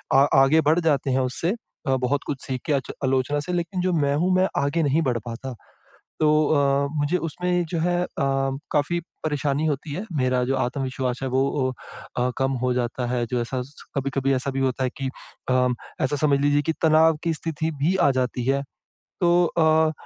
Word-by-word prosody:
आ 135 - +7 0.2
आगे 155 +4 +4
बढ़ 160 +3 +4
जाते 145 -5 +1
हैं 130 - +2
उससे। 130 +7 0 0.4
अ, 135 - +3
बहुत 130 +2 0
कुछ 140 -3 -3
सीख 130 -2 -3
के 150 - +2
आच 135 -3 -1
आलोचना 135 +2 +1
से - - -1
लेकिन 175 +1 -2
जो 185 0 +1
मैं 145 -3 +2
हूँ 180 +5 +2
मैं 185 +1 +3 0.2
आगे 160 +4 +1
नहीं 145 +2 +2
बढ़ 120 - 0
पाता। 120 +2 -6 0.7
तो 155 - +4 0.3
अ, 140 -1 +2
मुझे 145 +5 +1
उसमें 180 +2 -1
जो 170 - -1
है 175 +1 +1
अ, - - -4
काफ़ी 140 +4 0 0.3
परेशानी 145 -1 0
होती 145 0 -2
है। 190 - -4
मेरा 130 -1 +1
जो 135 +2 0
आत्मविश्वास 130 -1 -2
है 130 - -1
वो 130 +1 +1 0.5
अ, 125 +1 +2
कम 135 0 +1
हो 125 0 +2
जाता 120 0 -2
है। 120 -1 0
जो 125 +1 -1
ऐसा 125 +2 -3
स 140 +4 -14 0.2
कभी-कभी 135 0 0
ऐसा 130 +2 -1
भी 135 - -2
होता 130 0 0
है 125 - 0
कि 135 - -1 0.4
अ, 125 0 +3 0.4
ऐसा 140 +3 0
समझ 140 -1 +2
लीजिए 145 +1 +3
कि 160 - +2
तनाव 160 0 +5
की 165 - +1
स्थिति 160 0 -2
भी 175 +6 +3
आ 140 - +4
जाती 125 -2 -1
है। 135 +1 +2 0.6
तो 175 -1 +4
अ, 160 -1 +3
140 Hz, 200 wpm, -24 LUFS, 130-160 Hz, 0.7 s, आ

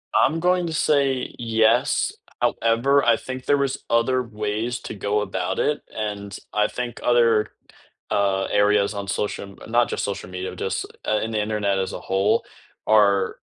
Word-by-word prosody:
I'm 160 +4 +3
going 180 +1 +2
to 160 - -4
say 140 -4 +1
yes, 115 0 +2 0.3
however, 120 +5 +2
I 120 -1 +5
think 130 0 -7
there 145 - +3
was 140 -1 -1
other 125 +2 +2
ways 110 +2 -3
to - - -7
go 105 +1 0
about 95 -3 -2
it, 150 - +1
and 100 -2 -4 0.2
I 105 0 +3
think 125 -1 -5
other, 115 -3 +3 0.6
uh, 100 -1 +1
areas 105 0 +3
on 100 -1 -5
social 105 +2 -2
m 100 - -14
not 120 0 +3
just - - -2
social 100 -2 -4
media, 90 0 -5
just - - -2 0.2
i 110 - +1
in 110 - -3
the 110 -1 0
internet 105 -2 0
as 95 - -2
a - - -5
whole 95 +1 +1 0.4
are 100 -3 +3
110 Hz, 170 wpm, -23 LUFS, 100-120 Hz, 0.6 s, I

